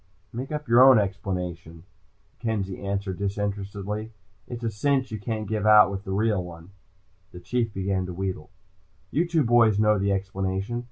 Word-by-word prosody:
"Make 130 +5 -5
up 150 0 -4
your 120 +2 +7
own 130 -2 +8
explanation," 90 -4 -3 0.6
Kenzie 100 -5 -3
answered 100 -1 -3
disinterestedly. 100 +2 -4 0.3
"It's 120 -1 -7
a 115 - -1
cinch 130 +4 0
you 110 - -4
can't 110 0 -4
give 110 0 -1
out 105 -2 +7
with 100 0 -6
the 95 - -5
real 105 -1 +1
one." 85 +1 -11 0.6
The 90 - -10
Chief 115 +5 -1
began 95 -1 -2
to 90 - -6
wheedle. 95 -4 -4 0.6
"You 170 +3 +1
two 165 -3 +2
boys 115 -3 +4
know 105 -1 +3
the 100 +1 +1
explanation. 95 +3 -2
100 Hz, 165 wpm, -25 LUFS, 95-115 Hz, 0.6 s, own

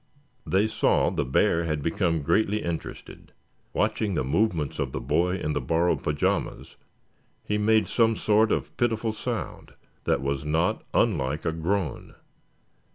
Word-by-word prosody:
They 95 +3 +3
saw 110 - +2
the - - -1
bear 85 +6 +2
had 75 -3 -2
become 85 -2 0
greatly 105 +6 +1
interested. 85 -1 -6 0.4
Watching 105 -4 0
the - - 0
movements 80 - 0
of 65 -2 -2
the - - -2
boy 85 +8 +1
in 75 -5 -2
the 75 - -1
borrowed 85 +7 +1
pajamas 75 -1 -1 0.7
he 105 0 -1
made 110 +1 +3
some 115 -1 +2
sort 110 +1 +3
of - - -2
pitiful 115 -2 0
sound 110 - -5 0.3
that - - +1
was 70 0 -1
not 80 +3 0
unlike 65 +3 +1
a - - +1
groan. 85 0 -2
85 Hz, 145 wpm, -26 LUFS, 75-105 Hz, 0.7 s, They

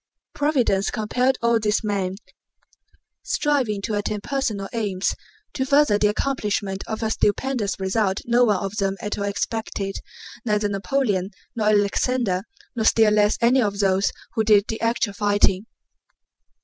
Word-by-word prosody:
Providence 260 -10 +1
compelled 250 +5 0
all 235 -1 +3
these 210 +1 0
men, 195 -3 -1 1.1
striving 255 -9 0
to 220 - -2
attain 205 0 -2
personal 220 -7 -2
aims, 200 -5 -1 0.4
to 265 - -1
further 280 -6 +3
the 210 - +4
accomplishment 210 -4 -2
of 220 0 -4
a 220 - 0
stupendous 215 -2 0
result 190 0 0
no 240 +1 +3
one 210 -3 +3
of 195 +1 -5
them 195 -1 0
at 210 0 -4
all 200 - -1
expected—neither 210 +1 -3
Napoleon, 200 -1 0 0.3
nor 215 -2 0
Alexander, 205 0 +1 0.3
nor 225 - -1
still 220 -1 +5
less 210 0 +3
any 250 +3 +4
of 205 -3 -1
those 195 -1 +2 0.2
who 220 - +1
did 210 -2 +4
the 220 - -4
actual 230 -2 0
fighting. 205 -1 +1
210 Hz, 140 wpm, -23 LUFS, 200-235 Hz, 1.1 s, still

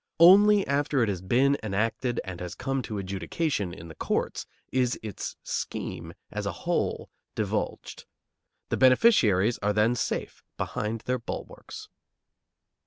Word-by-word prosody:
Only 200 +4 +7
after 140 -2 +1
it 110 - 0
has 95 -3 -3
been 130 +9 +2
enacted 115 +4 -1
and 90 -3 -7
has 90 -1 -5
come 135 0 -2
to 110 -4 -5
adjudication 100 - -2
in 85 -2 -10
the 80 - -10
courts - - -2 0.2
is 125 -1 +1
its 105 -3 -5
scheme - - -4 0.2
as - - -3
a - - 0
whole - - -1 0.2
divulged. - - -3 0.6
The - - 0
beneficiaries 120 - +4
are 105 0 +1
then 105 +3 +3
safe 125 - -3
behind 110 +1 -3
their 125 +1 -1
bulwarks. 115 - -8
115 Hz, 135 wpm, -27 LUFS, 100-135 Hz, 0.6 s, Only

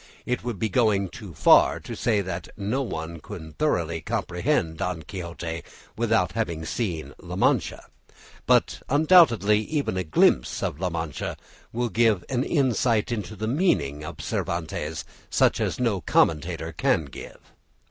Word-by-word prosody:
It 125 - -2
would 120 -3 -3
be 110 - 0
going 105 -3 +2
too 100 -5 -10
far - - +5
to - - -7
say 105 -3 +1
that 90 -3 -5
no 110 +7 -1
one 85 -9 -5
can 80 +1 -9
thoroughly 85 - 0
comprehend 80 +1 -1
"Don 85 -1 -3
Quixote" 85 -1 -6 0.3
without 110 -6 +1
having 85 -6 -3
seen 80 - -3
La - - -7
Mancha, - - +1 0.6
but - - +3
undoubtedly 135 - +5
even 140 -3 -2
a 90 - 0
glimpse 75 -5 +2
of 70 - -2
La 90 0 0
Mancha 80 -5 -4 0.3
will 120 +1 -1
give 110 -3 +2
an 130 -1 0
insight 125 -7 +1
into 110 -2 -4
the 110 +2 -4
meaning 115 - +1
of 75 - -7
Cervantes 80 -2 -3 0.2
such - - +3
as - - -1
no 115 -7 +1
commentator 75 -2 +1
can 80 - +1
give. 70 - -10
95 Hz, 145 wpm, -25 LUFS, 80-115 Hz, 0.6 s, far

